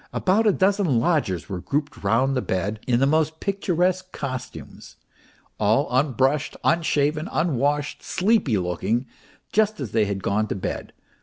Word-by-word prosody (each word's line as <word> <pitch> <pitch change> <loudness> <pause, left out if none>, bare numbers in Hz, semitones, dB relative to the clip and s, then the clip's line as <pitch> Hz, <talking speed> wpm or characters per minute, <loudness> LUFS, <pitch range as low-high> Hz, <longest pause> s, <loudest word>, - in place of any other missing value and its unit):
About 210 +4 +2
a - - +6
dozen 190 - +2
lodgers 120 - 0
were 95 -3 -5
grouped 145 - -3
round 130 +7 +2
the 130 - +1
bed 100 +2 -2
in 120 -2 +3
the 135 - +4
most 155 +2 +1
picturesque 185 -1 0
costumes, 130 -2 -7 0.6
all 110 +7 +2
unbrushed, 135 +2 +1
unshaven, 155 0 +1
unwashed, 145 -1 0
sleepy 190 - +1
loo 90 -2 -2
king, 115 +8 0 0.5
just 215 -2 +2
as 125 -8 -5
they 110 -1 +2
had 100 -1 -4
gone 105 +2 0
to - - -3
bed. 95 - -5
140 Hz, 150 wpm, -23 LUFS, 110-170 Hz, 0.6 s, a